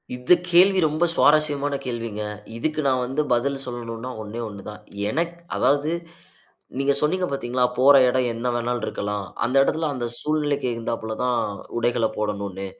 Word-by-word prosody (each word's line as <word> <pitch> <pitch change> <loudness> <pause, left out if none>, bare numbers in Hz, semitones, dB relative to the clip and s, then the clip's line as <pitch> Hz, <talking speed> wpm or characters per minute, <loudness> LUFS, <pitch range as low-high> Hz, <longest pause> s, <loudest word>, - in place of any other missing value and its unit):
இந்த 125 +7 +4 0.2
கேள்வி 185 +2 +6
ரொம்ப 155 +3 +1
சுவாரஸ்யமான 145 -2 +3
கேள்விங்க. 115 -3 -4 0.4
இதுக்கு 155 +5 -1
நான் 130 -2 +2
வந்து 135 +4 -1
பதில் 135 +3 +2
சொல்லணுன்னா 120 -1 -6
ஒண்ணே 110 +2 -7
1 100 -1 -9
தான். 105 - -8 0.3
எனக்கு 170 +7 -1 0.2
அதாவது 145 +3 +2 0.9
நீங்க 140 +1 +2
சொன்னீங்க 180 +5 +1
பாத்தீங்களா? 125 -2 0
போற 140 +2 +7
இடம் 125 0 +1
என்ன 115 +2 -3
வேணாலும் 120 0 -1
இருக்கலாம். 105 -1 -3 0.2
அந்த 125 +3 0
எடத்ல 160 +3 0
அந்த 120 -2 -3
சூழ்நிலைக்கு 145 -3 0
உகந்தாப்ல 115 -1 -4
தான் 125 -2 +1 0.4
உடைகளப் 120 -1 0
போடணுன்னு. 100 -2 -3
125 Hz, 145 wpm, -23 LUFS, 115-145 Hz, 0.9 s, போற